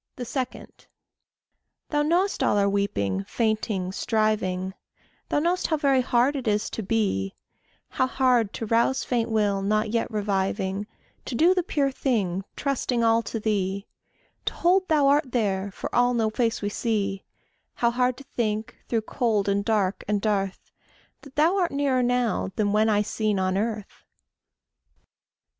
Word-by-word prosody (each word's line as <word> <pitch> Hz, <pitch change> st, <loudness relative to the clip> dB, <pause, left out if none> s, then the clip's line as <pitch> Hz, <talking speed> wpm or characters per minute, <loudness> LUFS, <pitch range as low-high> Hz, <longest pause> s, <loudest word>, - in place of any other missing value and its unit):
2. 250 Hz, -, -4 dB, 1.7 s
Thou 295 Hz, -1 st, +2 dB
knowest 350 Hz, +6 st, +1 dB
all -, -, +3 dB
our 200 Hz, 0 st, +3 dB
weeping, 195 Hz, -, 0 dB
fainting, 215 Hz, -5 st, -1 dB
striving; 190 Hz, -3 st, 0 dB, 0.6 s
Thou -, -, +1 dB
know'st 345 Hz, +4 st, +1 dB
how 315 Hz, -, +1 dB
very 275 Hz, -3 st, +3 dB
hard 250 Hz, +3 st, +2 dB
it 260 Hz, -4 st, -4 dB
is 210 Hz, 0 st, 0 dB
to -, -, -4 dB
be; 195 Hz, -, -1 dB, 0.5 s
How 260 Hz, -, 0 dB
hard 250 Hz, -5 st, +2 dB
to 225 Hz, -, -4 dB
rouse 230 Hz, +4 st, +2 dB
faint 235 Hz, -2 st, -1 dB
will 205 Hz, -3 st, +1 dB
not 215 Hz, +2 st, 0 dB
yet 230 Hz, 0 st, 0 dB
reviving; 200 Hz, -1 st, -1 dB, 0.4 s
To 245 Hz, -, -4 dB
do 335 Hz, +9 st, +5 dB
the 370 Hz, -, +1 dB
pure 285 Hz, -5 st, 0 dB
thing, 200 Hz, -9 st, -1 dB
trusting 255 Hz, -4 st, -1 dB
all 230 Hz, 0 st, +4 dB
to 225 Hz, -, -4 dB
thee; 200 Hz, -2 st, -1 dB, 0.6 s
To -, -, -2 dB
hold 370 Hz, +2 st, +3 dB
thou 300 Hz, -3 st, +3 dB
art 280 Hz, -1 st, +3 dB
there, 200 Hz, -4 st, 0 dB
for 195 Hz, -, -7 dB
all 245 Hz, 0 st, +3 dB
no 220 Hz, -2 st, +1 dB
face 230 Hz, -2 st, 0 dB
we 205 Hz, -, 0 dB
see; 205 Hz, -3 st, -1 dB, 0.5 s
How 235 Hz, -1 st, +2 dB
hard 250 Hz, +1 st, +1 dB
to 275 Hz, -, -11 dB
think, 220 Hz, -4 st, -3 dB
through 230 Hz, -2 st, +1 dB
cold 220 Hz, -3 st, 0 dB
and 200 Hz, 0 st, +1 dB
dark 205 Hz, -3 st, 0 dB
and 210 Hz, 0 st, +1 dB
dearth, 195 Hz, -2 st, -2 dB, 0.5 s
That 280 Hz, -2 st, -15 dB
thou 325 Hz, +6 st, +3 dB
art 355 Hz, -3 st, +1 dB
nearer 275 Hz, -2 st, +1 dB
now 245 Hz, -5 st, +1 dB
than 205 Hz, -2 st, +1 dB
when 215 Hz, +1 st, +3 dB
eye 210 Hz, -1 st, +3 dB
seen 215 Hz, -1 st, -1 dB
on 185 Hz, 0 st, 0 dB
earth. 210 Hz, 0 st, -3 dB
220 Hz, 155 wpm, -25 LUFS, 200-255 Hz, 1.7 s, do